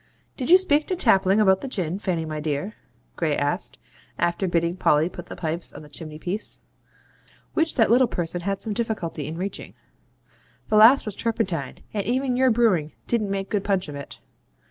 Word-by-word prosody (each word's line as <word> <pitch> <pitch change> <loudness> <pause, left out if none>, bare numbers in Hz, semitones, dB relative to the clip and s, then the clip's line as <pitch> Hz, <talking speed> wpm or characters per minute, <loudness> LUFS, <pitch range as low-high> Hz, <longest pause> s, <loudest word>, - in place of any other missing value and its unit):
'Did 260 +1 -3
you 365 - +10
speak 310 -5 +1
to 370 - -1
Tapling 195 - +3
about 190 -3 +4
the - - -5
gin, 185 -7 -3
Fanny, 175 -5 -1
my 155 -1 -4
dear?' 150 +6 -3 0.4
Gray 155 -4 0
asked, 145 0 -2 0.4
after 170 +3 0
bidding 170 0 0
Polly 155 -3 +3
put 175 -1 -10
the - - -8
pipes 165 +1 -3
on - - -11
the 150 - -14
chimney 155 0 -8
piece, 185 +7 -4 0.9
which 320 0 +1
that 225 -2 +3
little 250 +1 +5
person 175 -4 -3
had 195 +2 -3
some 220 - -3
difficulty 200 - -3
in 160 +2 -5
reaching. 195 +3 -5 0.9
'The - - +2
last 225 +6 +7
was 210 - -3
turpentine, 190 - -2
and 205 -2 -1
even 255 +1 0
your 260 +1 +4
brewing 215 -10 +2
didn't 220 -4 0
make 195 0 -3
good 205 -2 0
punch 195 -4 0
of 145 - -7
it.' 140 0 -8
195 Hz, 190 wpm, -24 LUFS, 165-225 Hz, 0.9 s, you